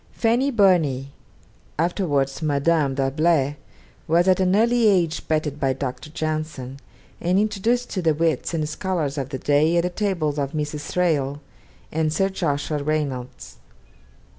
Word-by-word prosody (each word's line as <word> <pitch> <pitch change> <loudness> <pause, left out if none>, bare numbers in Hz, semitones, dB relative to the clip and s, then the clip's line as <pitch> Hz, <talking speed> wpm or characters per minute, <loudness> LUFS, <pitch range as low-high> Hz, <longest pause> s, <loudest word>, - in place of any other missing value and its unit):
Fanny 240 +4 +2
Burney, 165 - +2 0.7
afterwards 155 -5 0
Madame 145 -1 +1
D'Arblay, 145 +1 +1 0.5
was 170 +3 +3
at 185 -1 +4
an 185 0 +3
early 235 +1 +3
age 175 -6 +1
petted 155 -2 -1
by 135 -2 +1
Dr. 135 +3 -5
Johnson, 155 -4 -4 0.4
and 180 +2 +1
introduced 215 +4 0
to 185 - -2
the 160 -3 +2
wits 160 -3 0
and 155 -2 -1
scholars 155 -3 -2
of 135 -1 -4
the 135 - -4
day 150 +5 +2
at 170 - +3
the 180 - -1
tables 175 -7 -1
of 140 -1 -2
Mrs. 150 -1 -3
Thrale 145 -6 0 0.5
and 155 0 0
Sir 195 +5 +1
Joshua 150 -5 -2
Reynolds. 140 -4 -3
155 Hz, 140 wpm, -23 LUFS, 145-180 Hz, 0.7 s, at